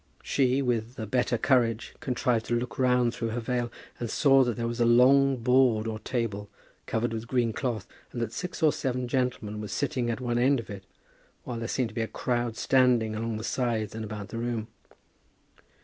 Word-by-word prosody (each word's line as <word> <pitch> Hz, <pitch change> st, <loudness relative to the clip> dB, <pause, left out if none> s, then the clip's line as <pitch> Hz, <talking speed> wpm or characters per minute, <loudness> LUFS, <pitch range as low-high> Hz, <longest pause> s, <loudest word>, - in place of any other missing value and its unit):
She, 135 Hz, 0 st, +2 dB
with 120 Hz, -1 st, -1 dB
a 110 Hz, -, -4 dB
better 120 Hz, +2 st, +1 dB
courage, 115 Hz, -3 st, +1 dB
contrived 120 Hz, -3 st, 0 dB
to 120 Hz, -, +1 dB
look 120 Hz, +2 st, -3 dB
round 125 Hz, -2 st, +3 dB
through 115 Hz, -, -3 dB
her 115 Hz, +2 st, -2 dB
veil, 120 Hz, 0 st, -2 dB, 0.3 s
and 120 Hz, -, -3 dB
saw 135 Hz, 0 st, +5 dB
that 120 Hz, -3 st, -2 dB
there 115 Hz, -, -2 dB
was 120 Hz, +1 st, -3 dB
a -, -, +4 dB
long 130 Hz, +3 st, +5 dB
board 125 Hz, -2 st, +3 dB
or 110 Hz, -1 st, -3 dB
table 105 Hz, -5 st, -3 dB, 0.4 s
covered 115 Hz, +1 st, -1 dB
with 115 Hz, +1 st, -5 dB
green 120 Hz, -3 st, +1 dB
cloth, 115 Hz, -6 st, -2 dB, 0.3 s
and 120 Hz, -, -5 dB
that 115 Hz, -1 st, -2 dB
six 180 Hz, -1 st, -5 dB
or 155 Hz, -, +5 dB
seven 125 Hz, -1 st, -2 dB
gentlemen 120 Hz, -5 st, -2 dB
were 105 Hz, -, -5 dB
sitting 125 Hz, +2 st, -1 dB
at 115 Hz, -, -2 dB
one 120 Hz, -2 st, -1 dB
end 135 Hz, +2 st, +3 dB
of 115 Hz, -, -8 dB
it, 95 Hz, -1 st, -8 dB, 0.6 s
while 120 Hz, -2 st, -5 dB
there 115 Hz, -, -3 dB
seemed 125 Hz, -1 st, -1 dB
to -, -, -14 dB
be 115 Hz, -, -2 dB
a 110 Hz, -, -1 dB
crowd 120 Hz, -2 st, -2 dB
standing 125 Hz, -4 st, +3 dB
along 115 Hz, 0 st, -2 dB
the 110 Hz, -, -6 dB
sides 115 Hz, -4 st, -1 dB
and 110 Hz, 0 st, -5 dB
about 105 Hz, -1 st, -6 dB
the 115 Hz, -, -5 dB
room. 115 Hz, -1 st, -3 dB
120 Hz, 205 wpm, -28 LUFS, 115-125 Hz, 0.6 s, saw